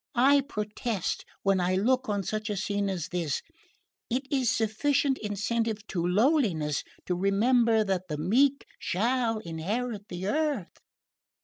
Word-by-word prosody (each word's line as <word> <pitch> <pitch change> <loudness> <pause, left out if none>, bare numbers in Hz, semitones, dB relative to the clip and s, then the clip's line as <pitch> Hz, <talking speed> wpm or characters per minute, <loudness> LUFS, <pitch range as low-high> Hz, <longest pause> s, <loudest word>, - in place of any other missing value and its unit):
I 275 +4 +5
protest 210 - -3 0.2
when 195 -1 +3
I 180 +1 +1
look 255 +5 +1
on 205 -1 0
such 215 +3 -3
a 205 - -2
scene 200 +1 -1
as 185 -2 -3
this, 170 -6 -2 0.7
it 250 +3 0
is 260 -4 +2
sufficient 265 +6 +1
incentive 215 +1 -2
to 175 -3 -1
lowliness 180 - +2 0.2
to 180 - 0
remember 220 +4 +3
that 190 -2 -2
the 150 - -2
meek 260 - +2
shall 230 +3 0
inherit 205 +5 -3
the 180 +1 -5
earth!" 290 - -1
210 Hz, 135 wpm, -28 LUFS, 190-245 Hz, 0.7 s, I